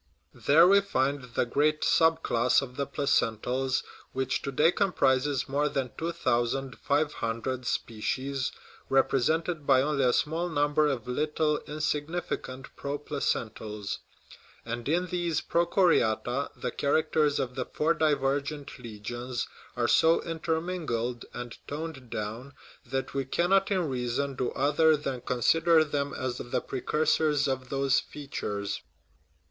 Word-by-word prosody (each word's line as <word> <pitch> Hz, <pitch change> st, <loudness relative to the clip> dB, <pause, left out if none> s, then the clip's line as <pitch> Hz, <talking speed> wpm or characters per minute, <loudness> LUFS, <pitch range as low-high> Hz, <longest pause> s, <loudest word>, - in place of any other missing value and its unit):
There 160 Hz, +5 st, +8 dB
we 200 Hz, +1 st, +6 dB
find 140 Hz, -7 st, 0 dB
the -, -, +2 dB
great 150 Hz, +5 st, +1 dB
sub 165 Hz, 0 st, +3 dB
class 120 Hz, +3 st, +3 dB
of 125 Hz, -2 st, -8 dB
the 140 Hz, 0 st, -2 dB
placentals, 130 Hz, -1 st, 0 dB, 0.3 s
which 130 Hz, 0 st, -1 dB
to 140 Hz, -, -4 dB
day 150 Hz, +5 st, +4 dB
comprises 140 Hz, -8 st, +1 dB
more 145 Hz, +2 st, +1 dB
than 130 Hz, -3 st, -2 dB
two 165 Hz, +1 st, -2 dB
thousand 130 Hz, -3 st, -1 dB
five 150 Hz, +1 st, +1 dB
hundred 120 Hz, +2 st, -3 dB
species, 130 Hz, +4 st, -2 dB, 0.4 s
represented 145 Hz, +4 st, +1 dB
by 130 Hz, 0 st, +5 dB
only 145 Hz, -2 st, +1 dB
a 125 Hz, -, +4 dB
small 165 Hz, +7 st, 0 dB
number 145 Hz, -1 st, +2 dB
of 130 Hz, -6 st, -2 dB
little, 150 Hz, +3 st, 0 dB
insignificant 150 Hz, -3 st, -3 dB
"pro 140 Hz, +1 st, -3 dB
placentals"; 110 Hz, -8 st, -3 dB, 0.7 s
and 120 Hz, +3 st, -4 dB
in 175 Hz, +3 st, +2 dB
these 175 Hz, -2 st, -1 dB
prochoriata 155 Hz, -, +2 dB
the -, -, -2 dB
characters 150 Hz, 0 st, +1 dB
of 125 Hz, -1 st, -2 dB
the 130 Hz, -1 st, -3 dB
four 160 Hz, +2 st, +1 dB
divergent 145 Hz, -2 st, -1 dB
legions 120 Hz, +2 st, -5 dB, 0.3 s
are -, -, +2 dB
so 165 Hz, +1 st, +5 dB
intermingled 160 Hz, -8 st, -2 dB
and 120 Hz, -1 st, -7 dB
toned 145 Hz, -4 st, -6 dB
down 115 Hz, +7 st, -5 dB, 0.3 s
that 135 Hz, 0 st, -3 dB
we 135 Hz, -, 0 dB
cannot 180 Hz, +8 st, +2 dB
in 185 Hz, -5 st, +1 dB
reason 130 Hz, +1 st, -1 dB
do 125 Hz, -1 st, -1 dB
other 150 Hz, +3 st, +3 dB
than 135 Hz, -4 st, -4 dB
consider 160 Hz, +8 st, +3 dB
them 145 Hz, -2 st, -2 dB
as 130 Hz, -1 st, -3 dB
the 120 Hz, -, -2 dB
precursors 150 Hz, +2 st, +1 dB
of 130 Hz, -1 st, -2 dB
those 135 Hz, -1 st, +2 dB
features. 105 Hz, -8 st, -5 dB
140 Hz, 130 wpm, -28 LUFS, 125-155 Hz, 0.7 s, There